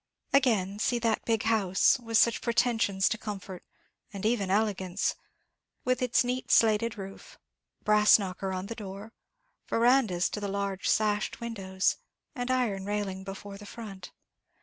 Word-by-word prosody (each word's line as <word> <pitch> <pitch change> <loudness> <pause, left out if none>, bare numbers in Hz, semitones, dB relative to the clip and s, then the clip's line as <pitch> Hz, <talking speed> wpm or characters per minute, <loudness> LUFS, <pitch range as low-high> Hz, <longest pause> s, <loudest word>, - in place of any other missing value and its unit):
Again, 210 -8 +2
see 240 +2 +1
that 230 -2 0
big 225 -2 +1
house, 215 +2 +3
with 230 -2 0
such 235 0 +3
pretensions 225 -5 +1
to 225 - -2
comfort, 195 -4 -7 0.5
and 200 0 -6
even 215 -4 +1
elegance, 195 -2 0 0.7
with 255 0 +1
its 250 0 +3
neat 250 +1 -3
slated 220 0 +3
roof, 195 0 -10 0.5
brass 210 0 +6
knocker 190 -1 -4
on 185 0 -3
the 230 - -5
door, 205 0 -9 0.5
verandahs 230 -7 +3
to - - -3
the 205 - -3
large 200 -1 -2
sashed 210 -1 +1
windows, 195 -5 -1 0.4
and 245 0 -4
iron 240 -7 0
railing 200 -2 -3
before 195 +1 -8
the 205 - -11
front. 200 -6 -9
210 Hz, 145 wpm, -29 LUFS, 195-230 Hz, 0.7 s, brass